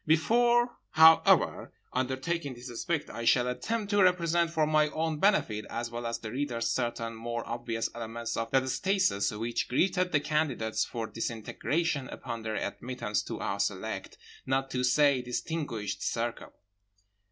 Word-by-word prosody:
Before, 240 +9 +3 0.2
however, 160 +1 +5 0.2
undertaking 130 +3 -2
this 120 +1 -9
aspect 150 +6 -2
I 115 - -6
shall 125 +1 +4
attempt 210 - -2
to 205 0 +4
represent 170 -2 +3
for 160 -2 +1
my 155 0 +3
own 160 0 -2
benefit 120 - +2
as 120 0 -4
well 120 0 -4
as 115 - -2
the 110 - -7
reader's 125 -4 -1
certain 120 -2 -2
more 120 +1 -5
obvious 120 -1 -2
elements 115 0 -5
of 115 0 -2
that 130 +1 +2
stasis 185 - +1
which 115 +2 -2
greeted 180 +6 +1
the 145 - +3
candidates 145 -7 0
for 115 -2 -4
disintegration 130 +7 -2
upon 115 -2 -6
their 110 -1 -3
admittance 115 -5 -3
to - - -5
our - - -2
select, - - -3 0.3
not 135 0 0
to 125 -1 -1
say 140 +1 +4
distinguished, 125 -4 -3
circle. 120 0 -3
130 Hz, 150 wpm, -29 LUFS, 115-160 Hz, 0.3 s, however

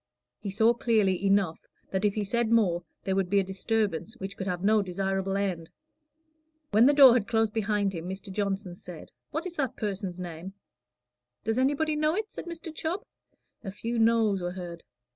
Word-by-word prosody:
He 205 - -5
saw 220 +4 +4
clearly 215 -6 +1
enough 195 -4 +1 0.2
that 190 +1 -1
if 205 -1 +2
he 210 - 0
said 235 +3 0
more, 185 -7 +3 0.2
there 190 - 0
would 190 -2 0
be 200 +1 +4
a - - +2
disturbance 205 +1 -1
which 195 -3 -6
could 190 - -5
have 180 0 -2
no 215 +1 +4
desirable 195 +1 -1
end. 180 -5 -2 1.0
When 220 +4 +6
the 290 - +5
door 275 -4 +9
had 230 -4 +1
closed 225 -2 +1
behind 210 -2 0
him, 170 +1 -5
Mr. 190 +1 -7
Johnson 195 -2 -2
said, 175 -2 -11 0.2
"What 320 +4 -3
is 350 -2 -6
that 265 -4 -1
person's 195 -4 -4
name?" 175 +1 -7 0.9
"Does 225 +3 0
anybody 290 +4 +1
know 305 +2 +1
it?" 430 +1 -3
said - - -7
Mr. 330 -1 -7
Chubb. 335 +6 -3 0.6
A 195 - -5
few 230 +4 -3
noes 225 -4 +3
were 175 0 -3
heard. 175 -2 -7
200 Hz, 185 wpm, -28 LUFS, 190-230 Hz, 1.0 s, door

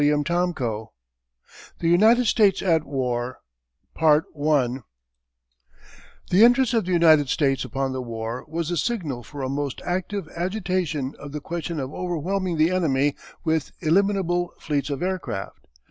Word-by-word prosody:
CHAPTER 150 +4 +2
IX 175 -2 -4 1.2
THE 165 - 0
UNITED 220 +8 +5
STATES 210 -4 +3
AT 165 -5 +2
WAR 125 -2 -2 0.6
The 150 -4 +2 1.6
entrance 245 +1 +5
of 225 -5 +2
the 185 - -3
United 160 -5 +5
States 135 -5 +1
upon 135 -1 -2
the 130 - -3
war 115 0 -5
was 165 +1 -3
the 175 - -1
signal 160 - -2
for 140 +3 -8
a - - -1
most 140 0 -3
active 185 +3 -2
agitation 175 -6 -2
of 145 0 -9
the 150 - -3
question 165 0 -4
of 135 0 -5
overwhelming 180 +1 -2
the 160 +3 +3
enemy 145 -6 +1 0.3
with 160 -3 -1
illimitable 175 0 +1
fleets 145 -1 -2
of 140 +3 -3
aircraft. 180 - -4
160 Hz, 135 wpm, -24 LUFS, 140-180 Hz, 1.6 s, UNITED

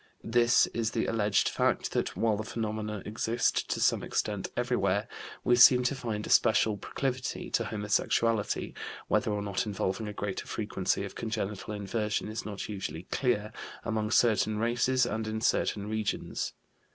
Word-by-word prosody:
This 120 +1 +4
is 115 -2 0
the - - -1
alleged 105 -2 +2
fact - - 0
that, - - -1
while 110 -2 +2
the 105 - -3
phenomena 110 -2 -3
exist 115 +2 0
to - - -1
some - - +3
extent 105 -2 -2
everywhere, 110 -4 +1 0.4
we 120 - +4
seem 125 +1 +8
to 125 - +1
find 115 -6 -4
a - - -7
special 110 -1 +4
proclivity 130 +5 -3
to - - +1
homosexuality 105 +1 0 0.4
(whether - - +2
or 105 -1 -1
not 100 +1 -2
involving 105 +1 -2
a 105 - -5
greater 100 -1 -4
frequency - - -1
of - - -8
congenital 105 -2 -4
inversion 105 +1 -2
is 110 0 -5
not 100 -2 -5
usually 95 -5 -5
clear) 110 -5 0 0.3
among 110 -1 -1
certain 110 -2 +3
races 120 +3 +2
and 110 -2 -2
in 110 0 -2
certain 105 -2 +1
regions. 110 -1 -2
110 Hz, 155 wpm, -29 LUFS, 105-115 Hz, 0.4 s, seem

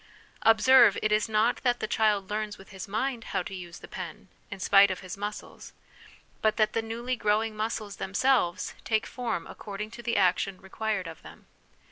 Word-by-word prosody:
Observe, 225 -1 +6
it 215 - +2
is 215 +1 +2
not 220 +2 +2
that 245 -1 0
the - - -1
child 210 -3 +1
learns 210 0 -3
with 195 - -15
his 190 -1 -8
mind 230 +4 -2
how 185 - +1
to 195 - -8
use 180 -2 -8
his - - -11
pen, 185 +3 -7 0.2
in 190 - -7
spite 200 +2 +6
of 185 - -4
his 185 -2 -7
muscles; 205 +1 -7 0.7
but 215 -1 +2
that 215 -1 +2
the 225 - +1
newly 235 +3 -3
growing 215 0 0
muscles 215 -1 -3
themselves 195 -3 +1
take 220 -1 0
form 235 -9 -3
according 210 +1 -7
to 240 - -9
the 235 0 -1
action 185 0 +2
required 200 0 -3
of 165 -1 -9
them. - - -14
215 Hz, 185 wpm, -28 LUFS, 195-225 Hz, 0.7 s, Observe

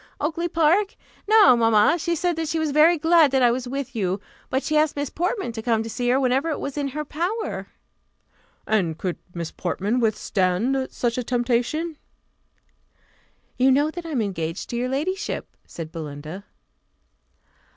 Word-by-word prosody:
"Oakly 335 +3 -1
park? 340 +5 +2 0.3
No, 430 - +7
mamma; 225 +7 +4
she 340 +2 0
said 350 +1 0
that 325 -1 -2
she 325 - -1
was 315 -2 0
very 315 +4 +5
glad 325 -1 +5
that 265 -1 +2
I 240 - +6
was 250 +1 -3
with 270 0 -5
you; 190 -2 -1 0.3
but 265 +1 0
she 310 - -1
asked 305 0 +3
Miss 285 -1 -3
Portman 360 - -2
to 225 -1 -6
come 225 -1 +1
to 225 - -6
see 245 +2 -1
her 255 +2 +3
whenever 265 +4 +1
it 310 - -2
was 280 - -5
in 290 -1 -1
her 300 +3 -4
power." 360 +10 -3 1.0
"And 175 -7 0
could 180 -1 -3 0.2
Miss 170 -1 -4
Portman 200 +6 -1
withstand 220 +3 0
such 240 0 -1
a - - -2
temptation?" 245 +7 -1 1.6
"You 260 +1 +5
know 290 +4 +3
that 345 0 -7
I - - -6
am 260 -8 0
engaged 165 -4 -4
to - - -3
your 245 +1 -1
ladyship," 340 +9 -3
said 160 -2 -7
Belinda. 155 +4 -7
260 Hz, 170 wpm, -23 LUFS, 220-315 Hz, 1.6 s, No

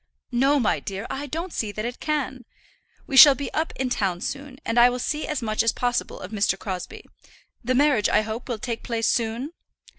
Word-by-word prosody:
"No, 270 +4 +3
my 235 - +1
dear, 195 +2 -6
I 285 +2 -4
don't 330 +5 -5
see 215 -2 -2
that 215 +1 -4
it 245 +1 -5
can. 270 -4 -2 0.6
We 275 - -4
shall 280 0 +10
be 280 - -6
up 315 +1 -1
in 260 -1 -2
town 190 -7 0
soon, 275 -1 -5
and 230 +1 +1
I 240 +1 +7
will 250 - -3
see 300 +5 -2
as 300 -5 -3
much 215 -1 0
as 230 - +2
possible 245 -1 -2
of 185 - -8
Mr. 205 -2 +1
Crosbie. 185 -2 -6 0.6
The 255 +2 0
marriage, 265 -6 +3
I 210 - +3
hope, 220 +4 -6
will 235 - -2
take 230 +1 -4
place 230 -2 -1
soon." 235 +5 -1
245 Hz, 210 wpm, -24 LUFS, 220-275 Hz, 0.6 s, shall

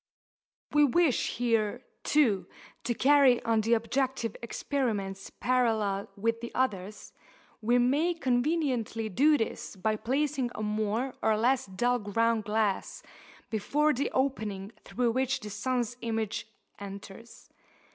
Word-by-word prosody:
If - - -24
we 295 - +6
wish 290 0 +2
here, 230 0 0 0.2
too, 240 -11 +2 0.4
to 240 - 0
carry 275 -2 +5
on 225 -1 +2
the 225 +2 +2
objective 245 0 -1
experiments 220 -6 -2
parallel 220 -6 0
with 230 +3 -1
the 235 - -6
others, 210 -5 -2 0.5
we 240 +3 +3
may 290 +8 +2
conveniently 250 -5 0
do 290 +9 +4
this 225 -3 -4
by 215 +3 0
placing 270 +2 0
a 215 - -4
more 215 +4 -1
or 220 -1 +2
less 245 +2 +2
dull 245 +6 0
ground 225 +1 +1
glass 210 -2 -1 0.5
before 290 +8 +2
the 270 +3 -1
opening 215 -7 -2
through 245 -1 0
which 260 +2 0
the 210 - -8
sun's 245 +1 -1
image 225 -2 -2 0.3
enters. 200 +3 -10
235 Hz, 125 wpm, -29 LUFS, 215-260 Hz, 0.5 s, we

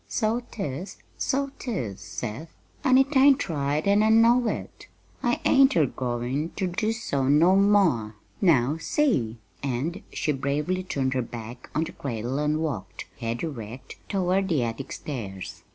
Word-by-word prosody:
"So 225 +1 0
'tis, 180 - -5 0.2
so 275 +1 -1
'tis, 125 - -4
Seth, 120 +8 -6 0.3
an' 260 -3 +5
it 270 +2 +2
ain't 275 -1 +5
right 145 -1 -1
an' 200 +1 +4
I 215 - +4
know 230 +2 +5
it. - - -5 0.3
I 240 -2 +1
ain't 270 0 +5
a 160 -4 +5
goin' 125 +4 -2
ter 195 - -1
do 215 +5 0
so 140 - -1
no 160 +7 +5
more; 190 - +3 0.3
now 150 - +3
see!" 155 - +1 0.2
And 140 +7 -2
she 150 - -1
bravely 145 +6 -1
turned 135 -8 -1
her 130 - +1
back 115 0 -8
on 155 - +2
the 165 - -5
cradle 125 +1 -3
and 150 +1 +1
walked, 95 - -4
head 115 +3 -3
erect, 130 -4 -7
toward 190 0 +1
the 150 -8 +2
attic 115 +3 -4
stairs. 100 -10 -6
150 Hz, 155 wpm, -26 LUFS, 125-200 Hz, 0.3 s, an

